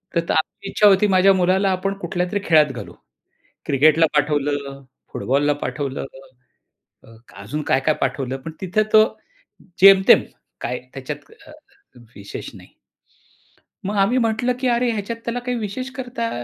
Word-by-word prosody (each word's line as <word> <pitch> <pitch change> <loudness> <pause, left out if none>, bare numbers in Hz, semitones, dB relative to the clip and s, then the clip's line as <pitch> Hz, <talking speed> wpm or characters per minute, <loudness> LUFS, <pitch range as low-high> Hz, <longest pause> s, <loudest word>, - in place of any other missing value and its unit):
तर 170 0 0
आपली 160 +4 -2
इच्छा 210 +1 +4
होती, 200 +1 +4
माझ्या 190 0 +4
मुलाला 190 +2 +2
आपण 195 +2 -1
कुठल्यातरी 180 +3 -2
खेळात 155 -3 +4
घालू. 100 -9 -9 0.7
क्रिकेटला 155 +4 +4
पाठवलं, 145 -2 -1 0.3
फुटबॉलला 145 +3 +1
पाठवलं 140 -2 -4 1.3
अजून 100 +11 -6
काय-काय 140 +3 +2
पाठवलं. 135 -2 -2
पण 160 +5 -8
तिथं 190 +3 0
तो 215 0 +8 0.8
जेमतेम, 195 -1 +7 0.4
काय 125 +1 -3
त्याच्यात 145 +2 -8 0.2
अ, 305 - -13
अ, 395 - -21 0.2
विशेष 100 0 -8
नाही. - - -15 1.2
मग 205 +1 -2
आम्ही 240 +6 +2
म्हटलं 230 +1 0
की 260 - -1
अरे 240 0 +1
ह्याच्यात 220 +2 -4
त्याला 240 +1 -2
काही 245 0 -3
विशेष 255 +6 -5
करता 245 -3 -4
185 Hz, 135 wpm, -21 LUFS, 145-220 Hz, 1.3 s, तो